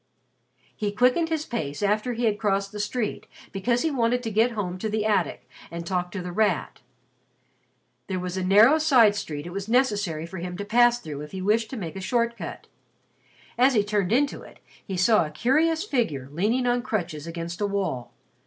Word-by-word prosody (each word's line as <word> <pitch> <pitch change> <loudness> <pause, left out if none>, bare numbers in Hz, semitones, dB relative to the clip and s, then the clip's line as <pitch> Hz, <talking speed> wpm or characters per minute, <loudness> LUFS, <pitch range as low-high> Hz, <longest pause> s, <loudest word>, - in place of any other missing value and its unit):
He 210 -2 -2
quickened 250 +10 +2
his 320 -1 -1
pace 155 - -4
after 215 +4 +1
he 235 +1 -1
had 210 -2 +1
crossed 195 -1 0
the 210 - -7
street, 210 +2 -3 0.2
because 235 +5 0
he 320 - +1
wanted 245 -2 +1
to 225 - -3
get 225 +4 +2
home 185 -4 -3
to 220 - -2
the 215 0 -1
attic 205 -5 0 0.2
and 170 0 -6
talk 180 0 -2
to 195 -3 -4
The 180 - -5
Rat. 205 -3 0 1.3
There 190 - -2
was 180 0 -4
a 190 - -2
narrow 215 +11 +6
side 255 -9 +5
street 150 -7 -5
it 175 - -7
was 200 +2 -5
necessary 205 -10 +1
for 185 +2 -8
him 180 +1 -5
to 200 - -5
pass 240 +2 +4
through 150 -8 -7
if 150 +3 -9
he 190 - -4
wished 220 +2 +1
to 265 - -6
make 170 -5 -6
a 190 - -5
short 235 +4 0
cut. - - -7 0.9
As 260 +1 +5
he 210 - +4
turned 205 -2 -1
into 275 +4 +1
it, - - -14 0.3
he 190 -3 -5
saw 205 +2 +4
a 155 - -5
curious 310 - +1
figure 225 - -1
leaning 215 - 0
on 245 0 +2
crutches 175 - -3
against 170 +2 -6
a 205 - +2
wall. 185 -11 -3
210 Hz, 200 wpm, -25 LUFS, 180-240 Hz, 1.3 s, narrow